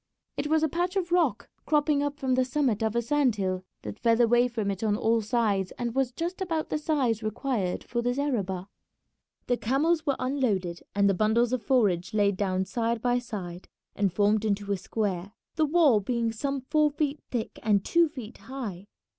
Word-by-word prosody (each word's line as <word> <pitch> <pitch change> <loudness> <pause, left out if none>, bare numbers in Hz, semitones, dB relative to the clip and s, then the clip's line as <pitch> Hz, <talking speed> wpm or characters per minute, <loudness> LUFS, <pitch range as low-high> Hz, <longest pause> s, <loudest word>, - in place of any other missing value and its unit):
It 290 - -2
was 315 +1 +2
a - - +4
patch 350 +4 -1
of 355 -3 -1
rock 355 -1 +2 0.2
cropping 295 -1 +2
up 290 0 -2
from 265 -3 0
the 255 0 +3
summit 255 -4 0
of 220 0 0
a 235 - +1
sand 270 -2 +2
hill 185 -2 -2 0.2
that - - -7
fell 230 -1 +3
away 240 +1 +4
from 220 -4 -2
it 195 - -5
on 210 -1 +1
all 225 +1 +2
sides, 210 -4 0
and 240 -2 -2
was 265 -1 +1
just 340 +8 -4
about 330 -4 -2
the 305 - -1
size 270 -8 0
required 215 -3 -2
for 240 - -2
the 245 +1 0
zareba. 215 -10 -1 0.8
The 245 - +1
camels 305 +8 +1
were 280 -3 +1
unloaded 215 -10 -1
and 200 0 +4
the 195 - +4
bundles 220 +5 +2
of 255 - 0
forage 205 -6 +1
laid 200 -2 +3
down 190 -1 0
side 230 +3 -1
by 245 +1 +1
side 190 -7 -7 0.3
and 200 -2 +1
formed 205 +3 +2
into 205 -1 -1
a 200 - +1
square, 195 -1 -3 0.2
the 315 0 +2
wall 295 -8 +5
being 230 +2 -1
some 275 +4 -3
four 300 +3 +2
feet 295 0 -2
thick 235 -3 -4
and 205 -3 +2
two 340 -1 +3
feet 250 -8 -9
high. 210 -5 -7
235 Hz, 195 wpm, -27 LUFS, 205-280 Hz, 0.8 s, wall